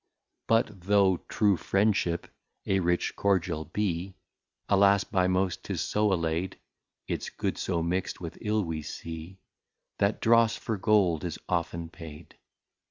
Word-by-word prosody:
But 110 -4 +1
though 95 -1 +4
True 105 -3 +3
Friendship 95 -4 +1 0.4
a 95 - +2
Rich 90 -1 0
Cordial 90 -5 0
be, 95 -2 -2 0.5
Alas, 100 0 +5
by 90 -2 +1
most 95 0 0
'tis - - -3
so 105 -1 +1
alay'd, 85 0 -1 0.5
Its - - -3
Good - - -2
so 85 -3 -1
mixt 90 +3 -2
with 85 -2 -7
Ill 105 -1 +1
we 80 -3 -3
see, 80 +4 -7 0.6
That 100 +1 +2
Dross 115 0 +4
for 110 - -3
Gold 95 -6 +3
is 85 -3 -3
often 85 -1 -2
paid. 80 -3 -11
95 Hz, 135 wpm, -28 LUFS, 85-100 Hz, 0.6 s, Alas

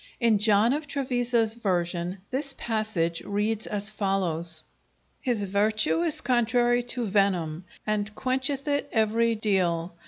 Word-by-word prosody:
In 230 -4 +3
John 215 +3 +4
of 295 +1 -3
Trevisa's 245 -5 0
version 180 -4 -2
this 275 +1 -1
passage 215 -7 -1
reads 210 +2 -1
as 205 0 -2
follows: 175 -6 0 0.6
His 240 -7 -1
vertue 215 - +1
is 330 -3 +3
contrary 240 0 +2 0.2
to 240 - 0
venym, 185 -5 0 0.2
and 210 -1 0
quencheth 265 +2 -1
it 285 -1 0
every 225 +1 +2
deale. 185 -5 0
215 Hz, 125 wpm, -26 LUFS, 195-240 Hz, 0.6 s, John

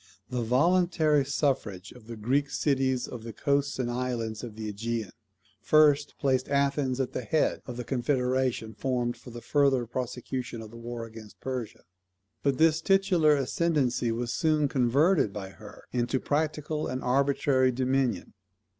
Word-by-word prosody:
The 125 -1 -1
voluntary 155 +4 +3
suffrage 130 -9 -1
of 120 -3 -15
the 115 - -6
Greek 135 +6 0
cities 130 -4 0
of 120 - -7
the 115 0 -7
coasts 140 +4 0
and 125 -2 -1
islands 120 -3 -3
of 115 -3 -7
the 110 -1 -5
AEgean 115 0 -3 0.5
first 150 -2 +4
placed 130 -3 +1
Athens 140 -2 +1
at 130 - -2
the - - -2
head 125 +7 0
of 125 -2 -6
the 125 - -3
confederation 125 -2 0
formed 125 -2 -1
for - - -13
the 120 0 -9
further 140 -3 +2
prosecution 125 0 -4
of 110 -1 -9
the - - -12
war 115 0 -6
against 110 -1 -12
Persia. 125 -5 -5 0.6
But 140 -2 +1
this 160 0 +4
titular 190 -6 +4
ascendancy 135 -4 0
was 120 +1 -2
soon 155 -2 +2
converted 135 - +3
by 100 -2 -6
her 105 +2 -13
into 125 +1 0
practical 150 +1 -1
and 130 +1 -4
arbitrary 135 0 +2
dominion. 130 0 0
130 Hz, 155 wpm, -28 LUFS, 120-145 Hz, 0.6 s, first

